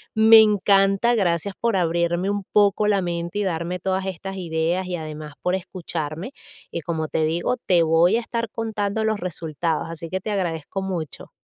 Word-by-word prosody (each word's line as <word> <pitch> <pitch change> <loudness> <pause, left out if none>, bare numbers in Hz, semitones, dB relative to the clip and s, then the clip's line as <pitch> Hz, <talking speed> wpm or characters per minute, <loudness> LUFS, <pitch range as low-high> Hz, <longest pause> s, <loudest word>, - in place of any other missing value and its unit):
me 220 0 +8
encanta. 200 +1 +3
Gracias 190 -3 0
por 230 -3 +1
abrirme 175 +1 +1
un 205 -1 -2
poco 210 0 +4
la 200 -2 +2
mente 170 +2 -3
y - - +1
darme 175 0 -2
todas 190 +1 -1
estas 195 +1 -5
ideas 170 +1 -1
y 180 - -2
además 155 -2 -7
por 180 - +1
escucharme. 175 - -5 0.4
Y - - -3
como 160 -1 -3
te 160 - 0
digo, 170 +10 0
te 175 -3 +4
voy 165 +5 +4
a 235 - +1
estar 230 -1 -3
contando 220 -1 -2
los 220 -1 0
resultados, 165 -2 -2
así 165 0 -7
que 185 0 -3
te 215 - -4
agradezco 180 -1 -2
mucho. 175 -6 -5
180 Hz, 180 wpm, -23 LUFS, 165-205 Hz, 0.4 s, me